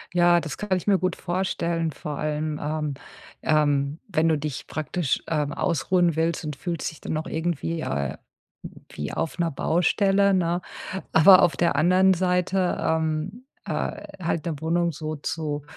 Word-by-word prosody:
Ja, 175 0 +5
das 155 -4 -6
kann 200 -3 0
ich 180 - -6
mir 200 -2 +3
gut 185 - 0
vorstellen. 170 -2 -1
Vor 150 0 -6
allem, 150 0 -2
ähm, 150 -1 -2 0.5
ähm, 145 -1 +1
wenn 165 -4 +2
du 155 - +3
dich 145 -2 -5
praktisch, 155 -1 -2
ähm, 150 -2 0
ausruhen 170 +1 +1
willst 165 0 0
und 150 - -4
fühlst 170 +3 -3
dich 160 - -16
dann - - -4
noch 155 0 -2
irgendwie, 165 0 -2
äh, 70 - -2 0.8
wie 75 - -5
auf 160 +1 -3
'ner 170 -1 +1
Baustelle, 195 +6 +2
ne? 175 -1 +1 0.5
Aber 185 +4 +8
auf 170 - +2
der 170 -4 +2
anderen 185 +4 +5
Seite, 180 +1 +1
ähm, 160 +8 -1 0.2
äh, - - -3 0.2
halt 165 0 -1
'ne 155 -4 -2
Wohnung 170 +1 +1
so 155 +1 -5
zu, 150 0 -3
165 Hz, 160 wpm, -25 LUFS, 150-180 Hz, 0.8 s, Aber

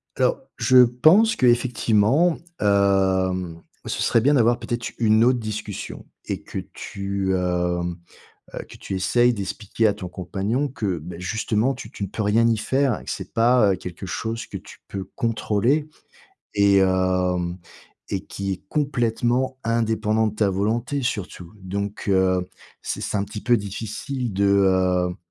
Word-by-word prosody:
alors - - +1 0.2
je 130 +3 +4
pense 160 - +4
qu'effectivement, 125 +5 +3 0.2
hem, 95 -4 +1 0.2
ce - - -3
serait 115 - +3
bien 145 +5 +4
d'avoir 120 -1 +3
peut-être 120 +1 -4
une 110 0 +4
autre 125 0 +3
discussion 105 -2 -6 0.2
et - - -4
que - - -5
tu, 100 -1 -3
hem, 90 -1 -1 0.6
heu, - - -5
que - - -12
tu - - -7
essaies 120 +6 +3
d'expliquer 105 +2 -1
à 105 - +2
ton 100 -3 -6
compagnon 100 +9 -2
que, 100 - -3
bah, 85 +3 -8
justement 110 +6 0
tu 130 - -9
tu - - -7
ne 100 - -3
peux 110 - -4
rien 110 +3 +3
y 115 -1 +2
faire 130 +1 +1
et - - -15
que - - -7
c'est - - -7
pas, 115 -2 +4
heu, - - -1
quelque 90 +1 -8
chose 115 +5 -4
que - - -7
tu - - -13
peux 95 -1 -5
contrôler 120 +5 0 0.7
et 100 -1 +4
hem 90 -2 +1 0.5
et 95 0 -2
qui 100 0 -4
est 95 - -7
complètement 125 -2 0
indépendant 110 -1 +1
de 110 - -3
ta 105 -2 +1
volonté 115 +8 -1
surtout. 95 -7 -4
Donc 100 +2 -4
heu, 95 -2 +2 0.3
c'est - - -4
c'est - - -2
un 100 - 0
petit 105 +1 -7
peu 120 - +4
difficile, 110 +4 -4
de, 100 +1 +1
heu, 95 -2 +2
105 Hz, 160 wpm, -23 LUFS, 95-120 Hz, 0.7 s, je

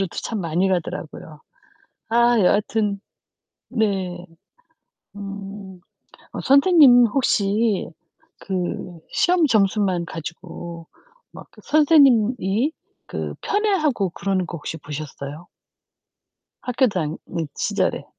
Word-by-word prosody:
외국으로도 - - -5
참 220 -4 -3
많이 175 +3 0
가더라고요. 160 -3 -4 0.7
아 235 +1 +4
여하튼 205 +1 +1 0.7
네. 190 -6 -1 0.9
음 195 -2 -8 0.6
어 - - -3
선생님 275 -4 +6
혹시 215 -3 +1 0.5
그 180 -2 -4
시험 355 -2 +3
점수만 195 -5 +2
가지고 170 +1 -8 0.4
막 - - -11 0.2
선생님이 260 - +3 0.4
그 - - -5
편애하고 315 - +1
그러는 190 -1 -1
거 - - -6
혹시 160 +1 -6
보셨어요? 150 +1 -8 1.2
학교 250 +1 +1
다닐 165 -6 -2 0.4
시절에. - - -1
200 Hz, 200 characters per minute, -22 LUFS, 175-240 Hz, 1.2 s, 선생님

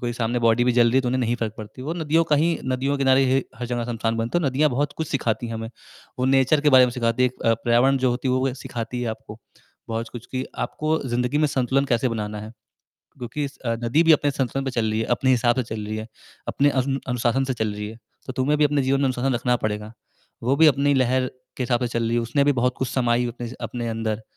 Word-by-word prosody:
कोई 120 -2 -2
सामने 120 0 -1
बॉडी 115 +1 +4
भी 125 - +3
जल 120 - +6
रही 115 - -1
है - - +5
तो 125 - -2
उन्हें 130 +1 0
नहीं 120 -1 +1
फ़र्क 115 -3 -3
नहीं - - -37
पड़ती 110 +4 -14
है। - - -7
वो 160 - -2
नदियों 165 0 +1
का 150 - +5
ही 165 +3 +1
नदियों 130 +2 0
के 140 - -2
किनारे 135 0 +5 0.3
हर 120 +1 -5
जगह 120 -1 -2
श्मशान 115 -1 -2
बनता 115 +9 0
है 175 - -3
और 140 - +3
नदियाँ 145 +3 +2
बहुत 145 +3 -1
कुछ 160 -2 -3
सिखाती 120 -3 -1
है 115 - -6
हमें, 115 0 -5 0.5
वो 125 - 0
नेचर 135 +3 +3
के 150 0 +3
बारे 125 - +8
में - - -2
सिखाती 115 0 0
है 125 - +4
अ, 115 -2 0
पर्यावरण 120 +4 +2
जो 125 - +4
होती 125 +2 -2
है 130 - +2
वो 130 0 0
सिखाती 120 -1 -5
है 120 - -1
आपको 110 0 -9 0.5
बहुत 115 0 -3
कुछ 120 -1 -8
कि 130 0 -2 0.2
आपको 155 +1 -1
ज़िंदगी 125 +4 0
में 155 - +3
संतुलन 135 0 +1
कैसे 120 +2 +2
बनाना 105 -2 -4
है। 110 +1 -8 0.7
क्योंकि 125 +4 -4
इस 140 0 -7
अ, 115 -1 0
नदी 125 +8 +3
भी 165 -1 +6
अपने 145 -1 +3
संतुलन 135 0 -2
पे 135 - -2
चल 115 -3 0
रही 110 +1 -1
है, 110 - -1
अपने 130 +2 +1
हिसाब 120 -1 +3
से 130 - +1
चल 110 -2 -6
रही 110 +1 -4
है, 110 0 -5 0.4
अपने 145 +1 +2
अनु 135 +1 -1
अनुशासन 125 +2 +1
से 130 -1 -2
चल 110 -2 -2
रही 105 0 -5
है। 110 - -10 0.3
तो 130 - -4
तुम्हें 130 +3 +1
भी 150 - +4
अपने 145 -1 +2
जीवन 135 +1 +1
में 140 - +2
अनुशासन 130 0 0
रखना 125 +1 +1
पड़ेगा, 105 0 -3 0.5
वो 130 +4 +1
भी 160 +2 +6
अपनी 145 -1 +3
लहर 130 0 +2 0.3
के - - -2
हिसाब 120 -1 0
से 125 - 0
चल 115 - 0
रही 115 - 0
है। 120 - +2
उसने 120 +5 +1
भी 145 - +4
बहुत 125 -1 0
कुछ 130 - -1
समाई 120 -1 +1
अपने 120 0 -6
स 125 - -9
अपने 120 -1 -4
अंदर 110 -1 -3
125 Hz, 275 wpm, -23 LUFS, 115-135 Hz, 0.7 s, बारे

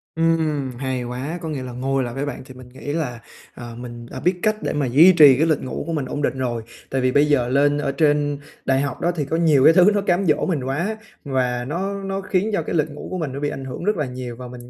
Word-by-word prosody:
Ừm, 160 -5 +1
hay 130 -1 -2
quá! 130 +7 -4
Có 160 - -5
nghĩa 140 -4 -4
là 125 - -6
ngồi 135 +2 -1
lại 120 -1 -5
với 135 +2 -3
bạn 145 -3 -6
thì 130 - -12
mình 130 -1 -13
nghĩ 135 +3 -6
là, 140 -7 -3 0.3
à, 120 -1 -9
mình 120 -1 -8
đã - - -6
biết 180 - +2
cách 215 0 +3
để - - -1
mà 145 -2 0
duy 155 +10 +7
trì 150 -6 +8
cái 160 +2 +2
lịch 155 - +1
ngủ 130 - -4
của 165 - -2
mình 150 -4 -1
ổn 145 +3 -4
định 135 - -1
rồi. 120 -3 -2 0.3
Tại 130 - -1
vì 130 0 +2
bây 145 +2 +4
giờ 140 -5 +2
lên 145 +2 +3
ở 145 -2 -1
trên 145 0 +1 0.3
đại 135 0 +2
học 140 -2 -4
đó 175 - +2
thì 150 -4 -1
có 160 +4 -1
nhiều 155 -5 +4
cái 165 - +8
thứ 185 +2 +6
nó 205 - +1
cám 195 0 +1
dỗ 150 -3 +2
mình 160 -8 -1
quá, 170 +12 -2 0.3
và 125 -3 -1
nó 195 +6 -3
nó 195 0 -3
khiến 190 +2 0
cho 170 - +1
cái 155 - -4
lịch 155 -1 +1
ngủ 145 - -8
của 185 - -2
mình 150 -6 -3
nó 140 - -5
bị 145 0 -1
ảnh 135 -2 -6
hưởng 130 +6 -6
rất 210 +2 +1
là 150 - 0
nhiều. 125 -2 -6
Và 125 0 -9
mình 120 0 -11
145 Hz, 285 wpm, -22 LUFS, 130-165 Hz, 0.3 s, trì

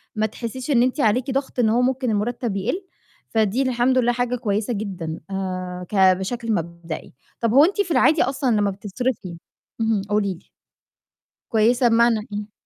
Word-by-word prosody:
ما 215 - +1
تحسّيش 245 +5 -5
إن 240 -2 +4
أنتِ 255 +4 0
عليكِ 250 +3 +2
ضَغْط 265 -1 -2
إن 225 - +4
هو 235 +3 +3
ممكن 255 -1 0
المُرتَّب 225 +1 -1
يقِل، 250 - -2 0.4
فدي 220 +2 +1
الحمد 255 0 +2
لله 245 -1 +3
حاجة 245 0 -1
كويسة 220 -1 -1
جدًا 185 -7 -4
آآ 185 -1 -4
ك - - -5
بشكل 195 +5 +2
مبدئي. 170 -2 -5 0.3
طَب 230 -1 0
هو 285 +4 +8
أنتِ 400 +2 +1
في 360 - -3
العادي 300 +2 +4
أصلًا 265 -2 0
لمّا 205 -1 +2
بتصرفي 200 -2 -4 0.4
اهم، 220 -2 +1
قولي 205 -2 +1
لي. 180 - -16 1.0
كويسة 240 +2 +3
بمعنى 235 0 +4
إيه؟ 205 +1 -5
225 Hz, 165 wpm, -22 LUFS, 200-250 Hz, 1.0 s, هو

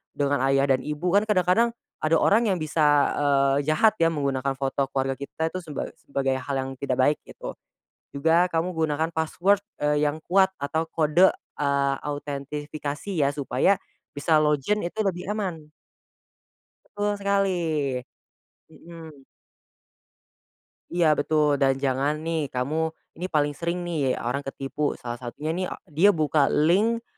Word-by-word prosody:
dengan 145 0 +1
ayah 135 0 +3
dan 130 - +3
ibu. 150 +6 -2
Kan 205 +3 +3
kadang-kadang 210 +4 +2 0.2
ada 155 +1 +2
orang 220 +8 +3
yang 195 - +2
bisa, 150 -1 +3
eee, 140 0 +2
jahat 155 +8 +4
ya 165 - +4
menggunakan 140 -4 -1
foto 135 0 -1
keluarga 135 0 -2
kita 160 +3 -3
itu 185 - -4
seba 160 -5 -5 0.2
sebagai 135 -1 -1
hal 140 +1 -4
yang 135 - -6
tidak 135 -2 -1
baik 140 +4 +2
gitu, - - -8 0.6
juga 165 +5 +3
kamu 165 +2 0
gunakan 160 0 0
password, 175 +5 +2 0.2
eee, 150 0 +2
yang 150 +2 -3
kuat 190 +2 +3
atau 160 +3 -1
kode, 160 +3 +4 0.3
eee, 140 -1 +1
autentifikasi 145 +3 -5 0.2
ya - - +2
supaya, 140 +6 +2 0.4
bisa 155 +2 +2
login 150 +6 +1
itu 175 - -8
lebih 180 -3 -2
aman. 175 -8 -4 1.2
Betul 205 0 -2
sekali, 200 -1 +2 1.2
mhm. 160 -4 -13 1.7
Iya 175 -1 +3
betul 150 -1 +2
dan 135 -1 +4
jangan 135 +2 +1
nih 160 -2 -1
kamu 130 +4 -2 0.4
ini 180 - -3
paling 145 -1 +3
sering 170 +1 -1
nih 155 -7 0
orang 125 +4 -1
ketipu 140 +2 -2
salah 120 0 -5
satunya 130 +5 -5
nih 185 - -1 0.3
dia 195 +5 +7
buka 150 -2 +3
link, 210 +10 +2
150 Hz, 140 wpm, -25 LUFS, 140-170 Hz, 1.7 s, dia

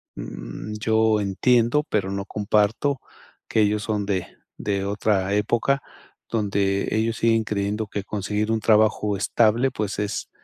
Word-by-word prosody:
mm, - - -7
yo 110 -1 +2
entiendo, 120 +8 +2
pero 95 -2 0
no 100 0 -3
comparto 105 +7 +1 0.5
que 110 - +2
ellos 105 0 +1
son 105 -2 -1
de 95 -3 -1 0.3
de 100 -2 -1
otra 100 -1 0
época, 120 +6 +1 0.5
donde 100 -3 0
ellos 110 +1 0
siguen 115 -1 +2
creyendo 105 +1 -2
que 100 0 -4
conseguir 105 +2 -2
un 115 - +1
trabajo 105 -1 +3
estable, 115 +5 +2
pues, 105 -2 -3
es 105 0 -3
105 Hz, 140 wpm, -24 LUFS, 100-110 Hz, 0.5 s, trabajo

